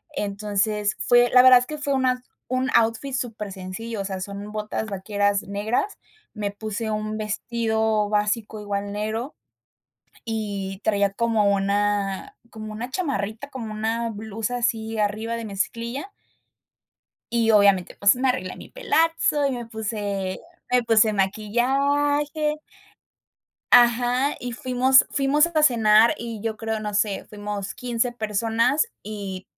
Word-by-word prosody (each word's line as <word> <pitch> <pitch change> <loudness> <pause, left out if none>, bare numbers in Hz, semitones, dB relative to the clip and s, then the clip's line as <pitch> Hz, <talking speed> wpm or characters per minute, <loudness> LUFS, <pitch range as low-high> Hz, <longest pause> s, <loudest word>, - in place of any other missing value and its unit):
Entonces 205 0 -1
fue, 245 0 +4
la 250 0 +7
verdad 255 -1 +9
es 245 - -4
que 305 - -5
fue 285 -1 -1
una 255 -1 +1 0.3
un 255 0 0
outfit 230 +4 +2
supersencillo, 210 -2 -5
sea, 190 -1 -4
son 200 +2 -6
botas 215 +1 -3
vaqueras 200 +1 0
negras. 215 - -2 0.4
Me 205 -2 -3
puse 215 +2 -4
un 215 0 -3
vestido 220 -1 0
básico 210 +1 -1
igual 200 -1 -3
negro, 220 +6 -3 0.9
y 200 -3 -4
traía 200 -2 +2
como 215 -2 +2
una 200 - -1
como 215 -1 -8
una 235 +4 -5
chamarrita, 260 - -3
como 235 -6 -6
una 225 +2 -1
blusa 220 +2 -4
así 225 -2 -1
arriba 215 +2 -1
de 230 - -5
mezclilla 235 - -3 1.2
y 230 -1 +3
obviamente, 200 -3 +4
pues 200 +3 +5
me 260 +1 +1
arreglé 185 -8 -2
mi - - -12
pelazo 330 -10 +1
y 275 - -1
me 240 -2 -4
puse 205 -4 -3 0.3
me 250 -1 +3
puse 220 -1 +4
maquillaje. 280 +9 +1 1.1
Ajá, 245 +3 +4
y 245 0 -5
fuimos 255 +2 +4
fuimos 290 +3 +3
a 315 -3 +1
cenar 225 -4 +5
y 230 -2 -6
yo 220 0 -3
creo, 220 0 -3
no 210 -1 -4
sé, 205 -1 0
fuimos 205 -1 -5
15 245 0 -1
personas 225 - +1 0.2
y 200 -3 -6
220 Hz, 130 wpm, -24 LUFS, 205-245 Hz, 1.2 s, verdad